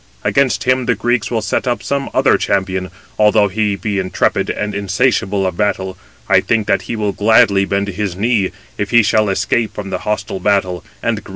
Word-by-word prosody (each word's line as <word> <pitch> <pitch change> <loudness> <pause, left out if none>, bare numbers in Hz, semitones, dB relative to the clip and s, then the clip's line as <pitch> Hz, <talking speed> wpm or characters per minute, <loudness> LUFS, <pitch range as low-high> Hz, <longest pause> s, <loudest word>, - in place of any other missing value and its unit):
Against 135 -4 +1
him 130 -1 +1
the 120 - +2
Greeks 120 -2 0
will 115 -2 -1
set - - -1
up 120 -5 -1
some 140 +5 -2
other - - +3
champion. 95 -1 -1 0.3
Although 105 -1 +4
he 105 +1 0
be 100 0 -2
intrepid 95 -1 0
and 105 0 -3
insatiable 100 -1 0
of 90 -2 -2
battle, 95 -2 -1 0.3
I - - +5
think 110 -2 0
that 100 - +1
he - - -1
will 105 -2 -1
gladly 100 -1 +4
bend 100 +1 -1
his 100 -2 -3
knee, 110 0 +1
257 - - -11
if 100 - -1
he 120 +1 +5
shall 105 0 +2
escape 110 +3 0
from 100 -2 -6
the 90 - -2
hostile 105 0 -3
battle 95 -3 0 0.2
and - - 0
the - - -7
grievous - - -27
fight." - - -14
105 Hz, 210 wpm, -17 LUFS, 95-110 Hz, 0.3 s, I